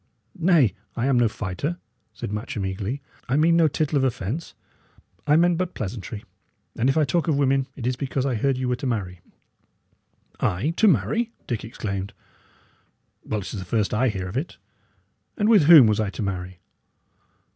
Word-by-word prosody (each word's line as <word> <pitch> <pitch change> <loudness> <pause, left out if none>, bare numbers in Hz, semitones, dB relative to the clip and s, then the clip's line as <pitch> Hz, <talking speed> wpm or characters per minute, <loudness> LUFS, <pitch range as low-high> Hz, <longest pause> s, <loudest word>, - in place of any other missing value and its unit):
"Nay, 160 - +4 0.2
I 120 - -1
am 135 -2 +3
no 120 -2 +3
fighter," 105 - -4 0.3
said 100 -1 -6
Matcham, 105 -1 -4
eagerly. 100 +9 -4 0.3
"I 135 - +2
mean 165 +2 +4
no 165 -1 +5
tittle 150 0 0
of - - 0
offence. 130 - -3 0.7
I 150 - +5
meant 170 +1 +3
but 185 -1 -2
pleasantry. 105 +1 -5 0.5
And 125 +4 +1
if 135 - +1
I 155 - +4
talk 170 +5 0
of 155 -4 +2
women, 135 -1 +2
it 120 - -6
is 125 +1 0
because 135 0 -2
I 135 - 0
heard 130 +4 0
ye 130 - -2
were 125 0 +1
to 135 - -4
marry." 95 -7 -3 1.2
"I 105 - 0
to 220 - +5
marry!" 190 - +2
Dick 120 -4 -3
exclaimed. 100 -3 -5 1.1
"Well, 105 -1 -2
it 95 - -7
is 105 - -4
the - - -5
first 105 +3 -1
I 125 +4 +2
hear 95 -3 -4
of 95 - -5
it. 150 +6 -4 0.8
And 210 - +1
with 215 -9 +6
whom 155 -5 +10
was 110 -1 +2
I 110 -2 0
to 105 - -5
marry?" 90 -2 -5
125 Hz, 185 wpm, -24 LUFS, 105-150 Hz, 1.2 s, whom